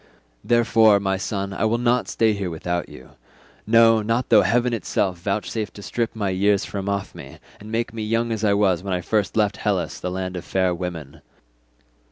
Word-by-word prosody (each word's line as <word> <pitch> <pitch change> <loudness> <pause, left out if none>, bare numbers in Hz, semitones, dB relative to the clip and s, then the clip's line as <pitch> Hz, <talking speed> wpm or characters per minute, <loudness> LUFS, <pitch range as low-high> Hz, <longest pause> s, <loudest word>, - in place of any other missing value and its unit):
Therefore, 115 -3 +4
my 95 -1 0
son, 100 +1 -3
I 105 - -1
will 110 +2 +1
not 120 +1 +1
stay 110 -1 +2
here 100 -3 -3
without 85 +1 -3
you—no, 115 - 0
not 115 +4 -1
though 110 -2 +7
heaven 120 +2 +1
itself 95 -4 -1
vouchsafe 105 +3 -3
to 100 - -11
strip 115 +1 -3
my 100 -3 -1
years 100 +1 +2
from 100 -1 -4
off 100 0 -3
me, - - -11 0.2
and 105 +1 -10
make 115 0 -2
me 115 - -5
young 115 +2 -1
as 110 -1 -3
I 100 -1 +3
was 95 -4 +2
when 95 0 -3
I 90 - -2
first 105 +3 -1
left 105 -3 +1
Hellas 100 -4 -2
the 90 - -3
land 95 0 -4
of 90 - -5
fair 95 0 0
women. 85 -5 -6
100 Hz, 195 wpm, -22 LUFS, 95-115 Hz, 0.2 s, though